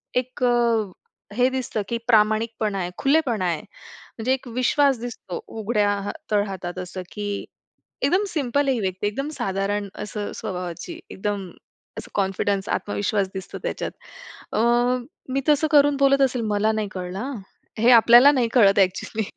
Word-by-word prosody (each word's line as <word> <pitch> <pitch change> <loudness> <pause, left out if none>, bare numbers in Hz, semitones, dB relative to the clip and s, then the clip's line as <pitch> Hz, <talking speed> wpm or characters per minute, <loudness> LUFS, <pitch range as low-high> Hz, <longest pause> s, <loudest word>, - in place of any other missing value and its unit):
एक 255 0 -2 0.9
हे 250 +3 +3
दिसतं 255 -5 -2
की 235 - -1
प्रामाणिकपणा 215 -2 +2
आहे, 175 -1 -2
खुलेपणा 270 -9 +2
आहे. 165 -3 -1
म्हणजे 225 +4 -6
एक 265 -1 -4
विश्वास 255 +2 +2
दिसतो 235 -7 -6
उघड्या 215 -1 0
हा - - -3 0.2
तळ 205 -1 +3
हातात 185 -2 -6
असं 185 +1 -6
की 205 -1 -5 0.8
एकदम 370 +9 +3
सिंपल 285 -4 0
आहे 265 - +3
ही 235 - -2
व्यक्ती, 190 +2 -2
एकदम 275 +8 -3
साधारण 200 0 -2 0.2
असं 210 0 -5
स्वभावाची, 180 - -6
एकदम 195 -2 -3 0.5
असं - - -10
कॉन्फिडन्स, 195 0 0
आत्मविश्वास 205 -1 -1
दिसतो 190 0 -7
त्याच्यात. - - -3 0.6
अ, 215 - +2 0.7
मी 275 - +1
तसं 300 +1 +4
करून 290 -1 +5
बोलत 275 0 +4
असेल 255 -3 +2
मला 215 +2 +2
नाही 215 -1 -2
कळलं 180 0 -5
हां. 260 +2 -4 0.4
हे 240 +3 +5
आपल्याला 240 +4 +8
नाही 250 -4 +1
कळत 200 -5 +5
ॲक्चुअली. 195 +3 0
220 Hz, 150 wpm, -23 LUFS, 195-260 Hz, 0.9 s, आपल्याला